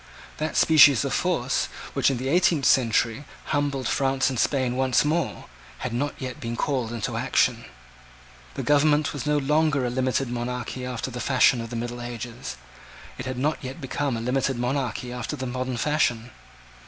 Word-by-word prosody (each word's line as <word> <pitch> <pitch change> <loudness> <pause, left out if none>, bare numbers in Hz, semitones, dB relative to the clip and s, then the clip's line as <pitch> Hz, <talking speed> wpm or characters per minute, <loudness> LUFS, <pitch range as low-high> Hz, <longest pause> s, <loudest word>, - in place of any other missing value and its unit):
That 155 +1 -2
species 145 -6 +6
of - - -2
force, - - 0 0.3
which, - - +3
in 135 - -1
the 130 +2 -4
eighteenth 165 -2 +3
century, 120 +1 +2 0.2
humbled 140 -3 -1
France 135 -1 +1
and 130 - -3
Spain 130 -2 +1
once 130 +1 +2
more, 155 0 -1 0.3
had 125 - -4
not 140 +4 -1
yet 130 +2 -6
been 115 -3 -4
called 125 -2 -1
into 115 -3 -3
action. - - +1 0.9
The - - -3
government 150 +1 +3
was 145 -1 -5
no 150 0 +2
longer 150 -1 +2
a 120 - -1
limited 130 +1 0
monarchy 125 +1 -4
after 125 +1 -4
the 125 0 -5
fashion 130 -2 +3
of 115 - -7
the 120 - -6
middle 120 +1 -4
ages. 120 -1 -6 0.6
It 130 - -5
had 130 -1 -4
not 150 +5 0
yet 130 +1 -6
become 135 -1 -2
a - - -4
limited 130 +2 0
monarchy 125 -1 -2
after 125 -2 -4
the 130 - -5
modern 130 0 -3
fashion. 120 -4 0
130 Hz, 175 wpm, -25 LUFS, 120-145 Hz, 0.9 s, species